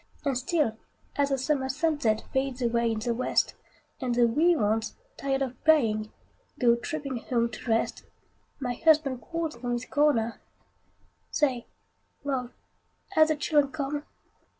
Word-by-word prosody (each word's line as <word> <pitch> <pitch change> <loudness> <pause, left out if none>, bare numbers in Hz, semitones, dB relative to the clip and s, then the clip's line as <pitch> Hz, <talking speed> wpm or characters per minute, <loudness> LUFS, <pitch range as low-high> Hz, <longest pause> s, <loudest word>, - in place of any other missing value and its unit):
And 275 -2 +1
still, 255 -4 0 0.4
as 285 -1 +2
the 275 - +1
summer 265 0 0
sunset 265 -6 +1
Fades 265 -1 0
away 235 -1 +2
in 225 - -1
the 235 +2 -1
west, 255 +2 +1 0.5
And 250 -2 0
the 240 0 +5
wee 315 +9 +4
ones, 220 -3 0 0.2
tired 275 0 0
of 255 -2 -6
playing, 220 -9 +3 0.5
Go 235 -2 +5
trooping 275 +1 -4
home 235 0 0
to 225 - -8
rest, 225 0 0 0.6
My 250 -3 -2
husband 295 -3 +3
calls 330 -4 -3
from 245 0 -3
his 240 +1 -2
corner, 245 -7 +1 0.9
"Say, 260 -6 0 0.6
love, 260 -3 -2 0.6
have 315 0 +5
the 310 - +1
children 290 -1 +2
come?" 290 0 -3
265 Hz, 145 wpm, -28 LUFS, 235-295 Hz, 0.9 s, the